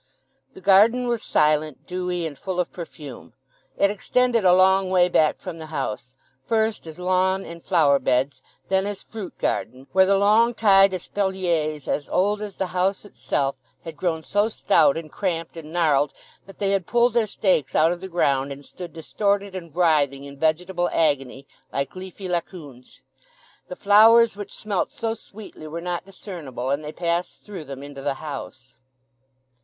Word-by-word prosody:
The - - -12
garden 220 +6 +5
was 235 -2 -1
silent, 150 -3 +1
dewy, 180 -1 -3
and 155 -3 -5
full 185 +3 -4
of 180 - -1
perfume. 155 -6 -9 0.4
It 200 - +3
extended 235 +2 +1
a 180 - +6
long 190 0 +4
way 180 -1 +4
back 155 -3 +3
from 175 -3 -7
the 160 - -8
house, 130 -4 -5 0.3
first 220 0 0
as 160 - -9
lawn 185 +1 +1
and 170 0 -9
flower 150 -6 +3
beds, 130 +3 0 0.3
then 190 +1 +1
as 205 -1 -5
fruit 215 -5 -8
garden, 130 +1 -2
where 190 0 +5
the 195 0 +4
long 220 +4 +4
tied 195 -3 +5
espaliers, 175 -6 -2
as 145 - -2
old 205 +3 +1
as 205 -2 -6
the - - -2
old 185 - -6
house 190 +3 0
itself, 135 - -2 0.3
had 165 -1 -8
grown 160 0 -2
so 205 +5 +1
stout, 195 -4 +3
and 160 -2 -7
cramped, 165 -5 -3
and 160 -2 -9
gnarled 150 -4 +2 0.3
that 195 - -13
they 195 -1 0
had 195 -3 0
pulled 240 0 +3
their 230 -2 +2
stakes 185 - 0
out 160 +2 +4
of 175 0 -4
the 190 - -6
ground 140 -6 +1
and 140 +1 -9
stood 175 -3 -9
distorted 200 +4 -1
and 170 -4 -8
writhing 150 -6 +2
in 140 0 -10
vegetable 175 +4 0
agony, 140 -4 0 0.3
like 140 +3 -3
leafy 185 +1 -8
Laocoons. 165 -7 -6 0.7
The 180 - -7
flowers 220 +3 +6
which 205 -1 -8
smelt 205 -4 -2
so 225 -1 -2
sweetly 205 -7 -11
were 160 +2 -5
not 175 +1 -4
discernible; 160 - -6
and 140 +2 -1
they 150 - -6
passed 170 +1 -3
through 190 -7 -8
them 135 0 -8
into 140 -1 -9
the 140 0 -1
house. 135 -4 -8
180 Hz, 175 wpm, -23 LUFS, 150-195 Hz, 0.7 s, a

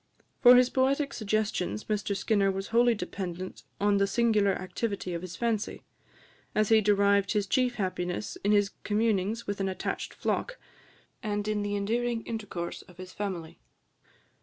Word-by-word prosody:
For 245 0 +9
his 250 0 +5
poetic 275 +2 +1
suggestions 215 -2 -1
Mr 205 -2 -1
Skinner 200 -2 +2
was 195 0 -3
wholly 235 +1 +4
dependent 185 -3 -5 0.2
on 205 0 +3
the 200 0 +3
singular 215 -3 +3
activity 185 0 -3
of 170 - -3
his 185 -1 -7
fancy; 230 -3 -2 0.7
as 215 -1 +2
he 220 -1 +6
derived 200 -1 +3
his 210 -2 +1
chief 250 +4 +1
happiness 185 -1 -3
in 205 - +2
his 205 -1 +3
communings 215 +1 0
with 205 0 -3
an 195 -1 0
attached 185 - -4
flock, - - -2 0.6
and 205 -2 -2
in 215 -1 0
the 205 0 -2
endearing 230 +3 -1
intercourse 205 -6 -5
of 180 - -18
his 185 0 -9
family. 185 -6 -5
205 Hz, 155 wpm, -29 LUFS, 195-225 Hz, 0.7 s, For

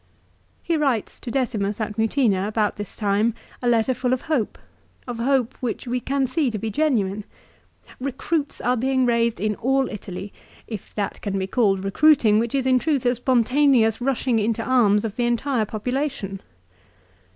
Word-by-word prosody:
He 335 - 0
writes 270 -8 -1
to - - -7
Decimus 215 -5 -1
at 215 -1 -3
Mutina 220 -3 +1
about 215 -1 0
this 205 -2 -7
time 210 +2 +1 0.3
a 245 - -1
letter 235 +2 +3
full 250 +1 0
of 255 - -1
hope, 300 -9 -1 0.5
of 245 -2 -5
hope 260 0 +1
which 245 0 -3
we 250 +1 -1
can 270 +2 0
see 275 +1 0
to 220 - -3
be 220 +2 -3
genuine. 210 -8 0 0.4
" - - -23
Eecruits 285 +3 -2
are 250 +1 +3
being 260 +1 +1
raised 235 -1 +1
in 215 +1 0
all 270 +1 +1
Italy, 195 -1 -7 0.3
if 215 -5 -8
that 205 -2 -3
can 195 -2 -2
be 190 - -1
called 195 -2 +1
recruiting 220 0 +4
which 235 +3 -1
is 265 -2 0
in 255 -1 +4
truth 285 -3 0
a 245 - +4
spontaneous 250 -1 +3
rushing 250 -2 +1
into 225 +1 0
arms 220 -5 +3
of 215 -2 -5
the 240 - +1
entire 240 0 0
population." 215 -3 -3
235 Hz, 175 wpm, -23 LUFS, 210-260 Hz, 0.5 s, recruiting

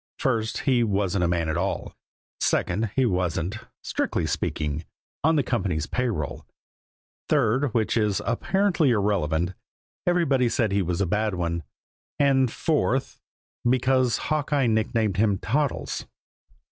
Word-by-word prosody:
First 115 -5 0
he 125 -3 +3
wasn't 100 -3 0
a - - +2
man 85 -1 0
at 80 +1 -1
all; 95 +3 -2 0.5
second, 105 +5 +1
he 130 - +3
wasn't, 90 0 -1 0.2
strictly 85 - -1
speaking, 75 0 -2 0.4
on 160 +2 +4
the 145 - +3
company's 95 -11 -1
pay 125 +8 -1
roll; 75 -11 -3 0.9
third, 135 -1 +2
which 110 -2 +1
is 105 -3 +1
apparently 175 - +2
irrelevant, 95 -6 +1 0.5
everybody 140 -9 +3
said 110 -3 +1
he 100 0 +2
was 90 0 -1
a - - +3
bad 105 +2 0
one; 85 -1 -1 0.6
and 135 -3 +3
fourth 135 -4 0 0.4
because 130 0 +2
Hawkeye 145 -2 0
nicknamed 110 -2 +1
him 100 -2 +3
Toddles. 115 - -1
110 Hz, 130 wpm, -25 LUFS, 90-130 Hz, 0.9 s, on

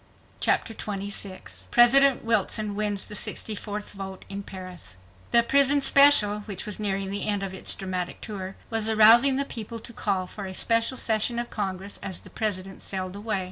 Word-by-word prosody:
Chapter 225 - +1
26 195 - -5
President 270 +2 +6
Wilson 215 -1 0
Wins 205 -2 -2
the - - -10
64th 210 0 -2
Vote 190 -1 -9
in 200 0 -6
Paris 185 - -10 0.3
The 235 0 +5
"Prison 280 +3 +3
Special," 275 -9 +5
which 200 -1 -5
was 210 -2 -4
nearing 195 -2 -2
the 200 +1 -3
end 205 -1 -1
of 190 -1 -5
its 190 - +1
dramatic 185 -2 -5
tour, 195 -3 -7 0.2
was 225 -1 +1
arousing 230 +5 +6
the 280 +1 -1
people 230 -2 -7
to 235 - -6
call 195 -4 -2
for 195 +1 -8
a 190 - -7
special 230 +5 +2
session 225 +1 +2
of 240 0 -4
Congress, 195 -1 -5
as 190 - -4
the - - -13
President 195 -3 -4
sailed 185 -1 -5
away. 205 -1 -3
205 Hz, 175 wpm, -25 LUFS, 190-230 Hz, 0.3 s, President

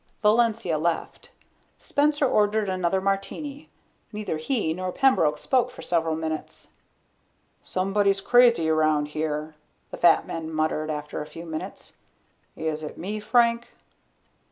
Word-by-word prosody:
Valencia 215 -6 +2
left. 165 +1 -3 0.5
Spencer 290 0 +1
ordered 210 -3 +2
another 185 0 0
martini. 200 +10 -3 0.4
Neither 210 -7 -3
he 160 - -1
nor 185 +1 -4
Pembroke 180 - +3
spoke 255 - +1
for - - -11
several 165 -2 0
minutes. 160 -1 -5 0.9
"Somebody's 195 +1 +1
crazy 235 -5 +4
around 155 -2 +2
here," 155 0 -3 0.4
the - - -6
fat 170 -1 +4
man 160 -1 -5
muttered 155 0 -1
after 150 0 -4
a 150 - -7
few 165 +2 -10
moments. 160 -1 -7 0.6
"Is 155 -1 -3
it 150 - -7
me, 210 +4 -4
Frank?" 235 +1 +2
185 Hz, 125 wpm, -25 LUFS, 155-220 Hz, 0.9 s, crazy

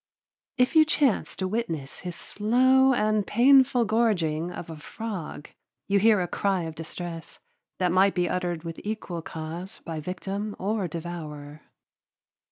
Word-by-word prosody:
If 250 +4 +2
you 315 - +9
chance 295 -6 +1
to 190 - -2
witness 165 -10 -3
his 175 -1 -6
slow 260 +5 +3
and 215 -3 +2
painful 255 +1 +5
gorging 180 -8 +1
of 165 -2 -7
a - - -6
frog, 180 -2 -6 0.4
you 200 0 +3
hear 210 -1 +5
a 175 - -1
cry 190 0 0
of 160 -1 -5
distress 165 +1 -7 0.4
that 180 -2 +1
might 190 +2 +4
be 180 -1 +1
uttered 175 -2 -2
with 165 -1 -7
equal 205 -5 -4
cause 160 +4 -7
by 160 -2 -4
victim 195 +5 -4
or 200 -1 -1
devourer. 155 -3 -7
185 Hz, 145 wpm, -26 LUFS, 165-220 Hz, 0.4 s, you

